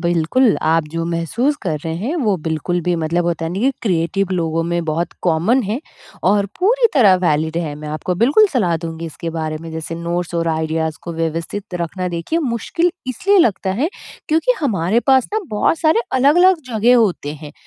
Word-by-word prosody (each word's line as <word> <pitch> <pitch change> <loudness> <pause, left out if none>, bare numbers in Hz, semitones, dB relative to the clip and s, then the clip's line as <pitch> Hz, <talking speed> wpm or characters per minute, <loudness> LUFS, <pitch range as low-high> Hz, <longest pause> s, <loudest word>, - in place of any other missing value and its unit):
बिल्कुल। 175 - +2
आप 165 +1 +3
जो 165 +1 -3
महसूस 170 - -1
कर 160 -6 -2
रहे 160 0 -2
हैं 230 - -3
वो 215 - +1
बिल्कुल 160 +2 -1
भी 175 +1 0
मतलब 165 +2 0
होता 165 -1 -1
है 165 - -3
नहीं 220 +9 +1
क्रिएटिव 185 0 0
लोगों 165 -2 0
में 170 0 -1
बहुत 165 +2 -2
कॉमन 180 +10 +2
है, 215 +4 -2 0.4
और 200 +1 +3
पूरी 470 +6 +3
तरह 215 -9 +6
वैलिड 160 0 +1
है। 155 -4 -3
मैं 150 +1 -8
आपको 155 +4 -3
बिल्कुल 300 - +5
सलाह 185 - +1
दूँगी 165 0 -5
इसके 165 +1 -6
बारे 160 -1 -3
में 165 - -8
जैसे 160 +1 -5
नोट्स 170 +1 -3
और 165 0 0
आइडियाज़ 160 0 -1
को 170 - -6
व्यवस्थित 165 +4 -4
रखना 180 +2 -3
देखिए 175 - -2
मुश्किल 300 - 0 0.2
इसलिए 385 - +2
लगता 205 - +2
है 305 - +2 0.4
क्योंकि 320 +11 +3
हमारे 210 - +1
पास 260 -2 +4
ना 435 - +1
बहुत 215 +9 +1
सारे 320 +7 +3
अलग-अलग 320 +7 +4
जगह 235 +2 +4
होते 185 -10 +1
हैं। 150 -1 -10
175 Hz, 185 wpm, -18 LUFS, 165-240 Hz, 0.4 s, तरह